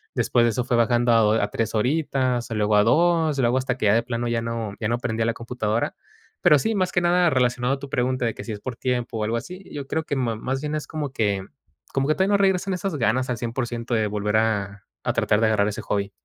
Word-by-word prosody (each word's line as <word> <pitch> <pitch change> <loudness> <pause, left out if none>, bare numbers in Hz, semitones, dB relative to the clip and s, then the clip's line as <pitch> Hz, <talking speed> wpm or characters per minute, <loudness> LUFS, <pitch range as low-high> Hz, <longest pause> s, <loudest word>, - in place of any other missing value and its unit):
Después 120 -1 +2
de 120 - +3
eso 125 +3 -1
fue 120 -2 +1
bajando 120 +1 +3
a 115 - +5
do 105 0 +4
a 100 - 0
3 115 +1 -2
horitas, 130 -1 0
luego 105 -1 +1
a 105 - +5
2, 160 +3 +3
luego 120 0 +2
hasta 130 -1 -1
que - - -2
ya 100 - +5
de 115 - +2
plano 120 0 -3
ya 115 -1 0
no 115 -3 -4
ya 105 - -1
no 120 - +1
prendía 110 -2 -1
la 115 - +1
computadora. 115 -1 -2 0.5
Pero 150 - +6
sí, 225 - 0
más 185 -2 0
que 175 - +2
nada 175 0 +3
relacionado 125 -1 +1
a - - -12
tu 140 0 -8
pregunta 130 -1 0
de 115 - 0
que - - -7
si 115 - -5
es 105 - -7
por 130 -2 -5
tiempo 125 -2 -2
o - - -1
algo 115 +2 -1
así, 180 +8 -8
yo 140 -2 -6
creo 160 - -1
que 145 - -2
ma 120 -4 -1
más 135 +4 -3
bien 150 0 -3
es 155 - -4
como 150 -4 -4
que 100 -7 -1 0.5
como 135 0 +1
que 155 - +3
todavía 190 +2 +1
no 200 - +5
regresan 190 -1 +1
esas 185 -1 -3
ganas 125 +1 +1
al 125 - -1
100% 120 0 -3
de 110 -1 +1
volver 105 +1 0
a 105 -2 -1 0.2
a - - 0
tratar 105 - +2
de 110 - +4
agarrar 105 -2 +2
ese 105 - -3
hobby. 100 -1 -2
120 Hz, 260 wpm, -24 LUFS, 110-140 Hz, 0.5 s, Pero